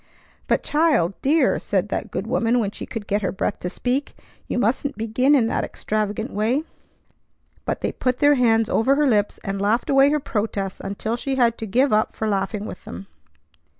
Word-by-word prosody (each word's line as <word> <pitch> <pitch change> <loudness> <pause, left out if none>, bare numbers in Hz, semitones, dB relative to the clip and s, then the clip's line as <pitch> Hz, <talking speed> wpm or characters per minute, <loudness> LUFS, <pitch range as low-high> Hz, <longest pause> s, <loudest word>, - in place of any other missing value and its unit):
"But - - +1
child! 295 - +2
Dear!" 290 0 +3
said 200 0 -1
that - - -3
good 195 - -4
woman 230 0 +1
when 210 -4 0
she - - -8
could 225 -3 -6
get 205 0 0
her 190 - -1
breath 195 - -2
to 180 - -3
speak. 255 +8 -2 0.3
"You - - -2
mustn't 255 +4 0
begin 230 +6 +2
in 250 -5 +3
that - - -1
extravagant 215 +2 -3
way!" 230 +8 +1 1.0
But - - -2
they - - -1
put 255 -1 -1
their 290 +2 +5
hands 225 -4 +3
over 260 +6 +2
her 295 +1 +2
lips, 210 -6 +2
and 195 0 -3
laughed 220 +6 +1
away 275 +1 +6
her 300 +1 +1
protests 205 -6 -3
until 210 +4 -3
she 270 +2 -2
had 235 -3 +3
to 225 - -4
give 255 +5 +2
up 215 +1 +1
for 220 - -2
laughing 200 +1 -1
with 185 - -8
them. 90 +3 -8
225 Hz, 195 wpm, -22 LUFS, 205-265 Hz, 1.0 s, away